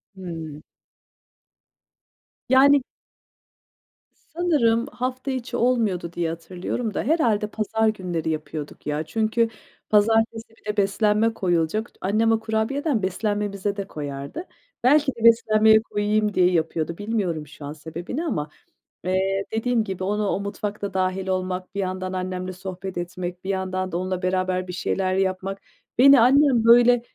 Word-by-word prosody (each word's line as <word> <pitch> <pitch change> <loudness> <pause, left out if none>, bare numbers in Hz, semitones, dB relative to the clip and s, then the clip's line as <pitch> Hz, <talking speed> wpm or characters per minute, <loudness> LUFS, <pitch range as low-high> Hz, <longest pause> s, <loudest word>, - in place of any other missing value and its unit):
Hımm. 165 -5 -7 1.9
Yani 270 +1 +6 1.5
Sanırım 270 -10 +2
hafta 255 +2 -3
içi 255 -1 -3
olmuyordu 220 -9 +1
diye 170 -1 -1
hatırlıyorum 180 +7 -4
da - - -2
herhâlde 230 -9 +2
pazar 220 +1 0
günleri 180 -6 -2
yapıyorduk 155 -1 -5
ya. 150 +1 -1
Çünkü 225 +6 0 0.4
pazartesi 225 +2 +2
bir 225 - -26
de 210 - -14
beslenme 210 +2 +2
koyulacak. 180 +3 -1
T - - -28
annem 215 +4 +2
o 225 - +3
kurabiyeden 225 - -1
beslenmemize 205 +1 -1
de 200 -1 -4
koyardı. 145 - -6 0.4
Belki 285 +2 +4
de 230 - -9
beslenmeye 220 -1 +6
koyayım 210 -1 0
diye 180 -1 +4
yapıyordu. 165 -1 -1
Bilmiyorum 195 -8 -2
şu 145 0 -11
an 145 - -5
sebebini 165 - -6
ama, 150 - -2 0.5
eee, 190 +2 0
dediğim 225 +1 +1
gibi 190 -3 -5
onu 210 +2 0
o 195 - 0
mutfakta 200 0 -4
dâhil 185 0 -1
olmak, 185 0 -3
bir - - -2
yandan 185 0 -3
annemle 185 0 -3
sohbet 185 0 -7
etmek, 175 +1 -5
bir 190 - -5
yandan 185 -1 -2
da 170 - -1
onunla 185 0 -2
beraber 185 0 0
bir 180 - -6
şeyler 185 +1 -1
yapmak. 190 +1 -1 0.4
Beni 275 +1 +8
annem, 260 -1 +5
böyle, 240 +1 +6
200 Hz, 135 wpm, -24 LUFS, 185-225 Hz, 1.9 s, Beni